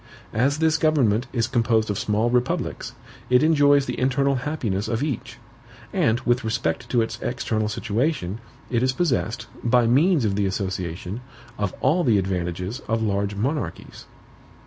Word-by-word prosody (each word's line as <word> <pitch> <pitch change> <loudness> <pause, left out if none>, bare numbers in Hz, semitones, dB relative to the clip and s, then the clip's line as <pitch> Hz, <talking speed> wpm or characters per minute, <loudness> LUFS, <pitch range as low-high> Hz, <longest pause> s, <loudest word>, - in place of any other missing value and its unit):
"As 135 +6 +2
this 160 0 +2
government 130 -7 +2
is 115 -3 +1
composed 115 -3 +1
of 100 - -2
small 110 +2 +1
republics, 125 0 -1 0.4
it 125 +3 +5
enjoys 145 -3 +4
the - - -4
internal 135 +2 +2
happiness 125 -8 -2
of 115 +3 -1
each; 145 -7 -4 0.6
and 110 +2 +2
with 120 -1 +1
respect 95 -7 -2
to 120 -2 +3
its 115 - -5
external 110 -3 -1
situation, 110 - -1 0.3
it 120 -2 +1
is 130 0 +2
possessed, 125 -7 -1 0.2
by 120 0 +4
means 145 +4 +3
of 100 -2 0
the 100 -1 +1
association, 95 +1 -4 0.4
of 105 -3 -1
all 160 +7 +3
the 115 -6 +4
advantages 90 +3 -2
of 115 0 0
large 100 -1 -1
monarchies." 120 - -4
115 Hz, 150 wpm, -23 LUFS, 105-135 Hz, 0.6 s, it